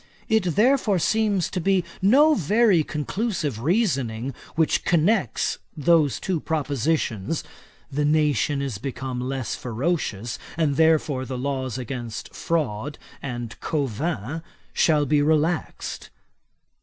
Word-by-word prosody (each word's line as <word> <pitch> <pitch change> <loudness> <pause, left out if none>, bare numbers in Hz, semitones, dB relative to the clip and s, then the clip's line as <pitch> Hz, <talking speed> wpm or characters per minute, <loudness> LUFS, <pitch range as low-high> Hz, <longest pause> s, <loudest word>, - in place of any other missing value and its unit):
It 190 -7 +1
therefore 225 -2 +3
seems 205 0 +1
to 185 - -2
be 190 +1 +2 0.2
no 280 +11 +6
very 205 - +3
conclusive 150 - -2
reasoning, 135 - 0 0.2
which 160 -1 +2
connects 180 +5 +1 0.2
those 155 -3 +3
two 185 -4 -1
propositions; 145 -4 -1 0.5
"the 145 +2 0
nation 150 -1 +2
is 125 -8 -4
become 130 0 -4
less 130 -1 -3
ferocious, 120 - -2 0.2
and 155 -4 +1
therefore 155 -4 +3
the 130 0 -5
laws 130 -2 -2
against 120 -3 -6
fraud 145 -4 -2 0.2
and 120 -4 -5
covin 145 - -2 0.3
shall 150 -3 +3
be 145 +1 +3
relaxed." 155 +2 0
150 Hz, 110 wpm, -24 LUFS, 130-175 Hz, 0.5 s, no